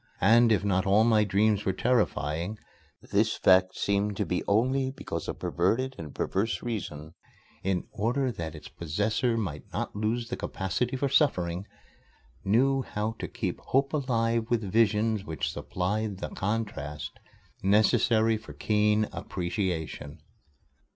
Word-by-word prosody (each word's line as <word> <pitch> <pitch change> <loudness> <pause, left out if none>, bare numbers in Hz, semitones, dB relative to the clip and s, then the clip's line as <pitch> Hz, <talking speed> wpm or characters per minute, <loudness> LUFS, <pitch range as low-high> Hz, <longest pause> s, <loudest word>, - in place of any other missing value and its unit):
And 115 +3 +6
if 105 -3 +3
not 95 0 +1
all 100 +3 +5
my 110 -2 +4
dreams 105 +1 +2
were 95 - 0
terrifying, 100 - 0 0.5
this - - +2
fact 95 0 +4
seemed 100 0 0
to - - 0
be 90 - -1
only 130 +6 +2
because 130 - -5
a - - -2
perverted 115 +10 0
and 75 -3 -8
perverse 110 +4 -1
Reason, 80 -10 -5 0.5
in 95 -2 -1
order 125 +5 0
that 80 -6 -6
its 75 - -10
possessor 105 +8 -1
might 85 -10 -4
not - - -3
lose 115 +3 -1
the 125 - -2
capacity 120 +7 -2
for 140 - 0
suffering, 90 - +1 0.8
knew 135 +7 +3
how 105 -3 -3
to - - -3
keep - - -4
Hope 135 +2 0
alive 115 -5 0
with 120 -2 +1
visions 110 +1 +2
which 80 -5 -3
supplied 100 +2 -2
the - - -5
contrast 95 -9 -4 0.4
necessary 110 +2 +3
for 110 - -11
keen 105 0 +2
appreciation. 85 -4 -3
105 Hz, 135 wpm, -28 LUFS, 95-115 Hz, 0.8 s, And